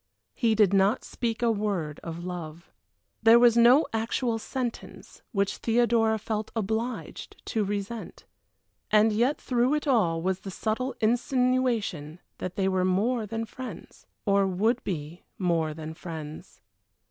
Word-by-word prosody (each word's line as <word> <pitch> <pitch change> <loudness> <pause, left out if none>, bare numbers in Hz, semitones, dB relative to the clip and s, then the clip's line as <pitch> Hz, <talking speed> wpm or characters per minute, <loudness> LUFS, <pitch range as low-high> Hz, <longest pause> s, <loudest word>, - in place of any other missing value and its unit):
He 230 -4 +1
did 205 -3 +4
not 195 +4 +3
speak 235 -1 -3
a 235 - +4
word 200 -8 -2
of 165 +1 -6
love. 170 -2 -7 0.5
There 225 +1 +7
was 235 -1 +6
no 240 +6 +6
actual 225 +1 -1
sentence 245 +1 -6
which 200 -4 0
Theodora 230 -1 +2
felt 215 0 -3
obliged 225 +3 -3
to 220 -3 0
resent 205 +3 -5 0.6
and 215 +1 +4
yet 245 +7 +1
through 250 +3 +1
it 300 - -2
all 210 - +2
was 185 +2 -1
the 195 - -8
subtle 225 +7 -2
insinuation 235 - 0 0.2
that 185 - -5
they 195 -2 +1
were 185 -1 +1
more 210 +5 +1
than 225 +2 -3
friends 225 -4 -10 0.2
or 200 -1 +3
would 205 +6 +1
be 165 -1 -5 0.2
more 170 -4 +1
than 155 +1 -7
friends. 160 -2 -9
215 Hz, 140 wpm, -27 LUFS, 185-235 Hz, 0.6 s, There